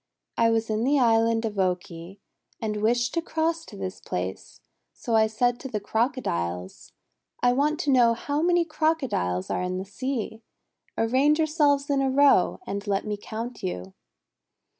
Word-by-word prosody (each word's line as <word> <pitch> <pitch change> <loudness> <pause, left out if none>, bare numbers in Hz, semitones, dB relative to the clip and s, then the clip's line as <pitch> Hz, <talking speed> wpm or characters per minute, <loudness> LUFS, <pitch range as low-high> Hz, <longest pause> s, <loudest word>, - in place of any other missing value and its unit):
'I 230 0 +3
was 225 0 0
in 215 +1 0
the 285 +3 +3
Island 230 -2 +3
of 210 -2 -3
Oki, 180 0 -3 0.4
and 210 -2 -3
wished 240 +2 +1
to 335 - 0
cross 325 0 -1
to 205 - -11
this 190 -1 -5
place, 90 +1 -5 0.3
so 230 - -2
I 220 0 +5
said 240 +3 0
to - - -6
the 215 -5 -3
Crocodiles: 90 - -2 0.5
'I 245 0 +5
want 295 +4 +1
to 285 - +1
know 240 -3 +5
how 285 +5 -2
many 345 0 +3
Crocodiles 270 - -1
are - - -1
in 180 0 -2
the 190 - -4
sea. 225 +1 -4 0.6
Arrange 265 +7 +3
yourselves 295 -3 +2
in 275 -1 +2
a 270 - +1
row, 280 +1 +4
and 200 +1 -5
let 200 -1 0
me 210 -1 -2
count 225 +4 -7
you.' 95 - -5
230 Hz, 165 wpm, -26 LUFS, 200-280 Hz, 0.6 s, I